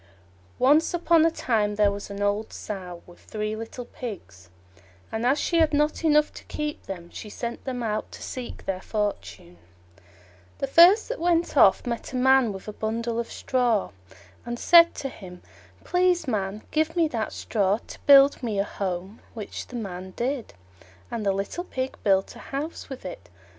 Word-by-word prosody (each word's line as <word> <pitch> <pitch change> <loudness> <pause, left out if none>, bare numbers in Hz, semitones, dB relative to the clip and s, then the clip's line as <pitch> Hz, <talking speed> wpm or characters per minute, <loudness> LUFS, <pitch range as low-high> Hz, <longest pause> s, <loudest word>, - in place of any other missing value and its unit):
Once 300 +7 +4
upon 335 -1 +4
a 330 - +5
time 215 -9 0
there 205 -1 +3
was 200 0 -6
an 200 0 -4
old 205 +2 0
Sow 180 -4 -7
with 175 - -16
three 215 0 -4
little 225 +2 -7
Pigs, 95 - -9 0.6
and 225 +2 -1
as 275 +3 +3
she 340 - 0
had 310 -2 +3
not 300 +3 +1
enough 300 -1 +3
to - - -11
keep 300 0 -4
them, 175 -3 -7
she 215 - -8
sent 235 +3 -5
them 250 -2 -3
out 215 -1 -2
to - - -10
seek 250 -2 -7
their 190 -1 -2
fortune. 205 - -4 1.0
The - - -1
first 345 +10 +6
that - - -4
went 340 0 +1
off - - +5
met 235 +1 -4
a - - -3
Man 260 -2 +4
with 190 0 -9
a 210 - -5
bundle 230 +2 -2
of 235 - -4
straw, 240 - 0 0.5
and 240 0 -4
said 335 +5 +6
to 270 - -4
him, 180 -7 -12 0.4
"Please, 360 -2 +2
Man, 210 -2 -2
give 315 +1 0
me 335 -2 +3
that 225 -5 -2
straw 200 -2 0
to - - -11
build 280 0 +7
me 225 -5 -2
a 195 - +2
house"; 190 -2 -4 0.2
which 215 -3 -6
the 250 - -10
Man 185 -4 -6
did, 250 - -3 0.6
and 230 -2 -3
the 200 - +2
little 195 - -3
Pig 260 -5 -4
built 195 -1 +2
a - - -11
house 290 +4 -6
with 265 -6 -8
it. 105 - -8
230 Hz, 180 wpm, -25 LUFS, 200-285 Hz, 1.0 s, build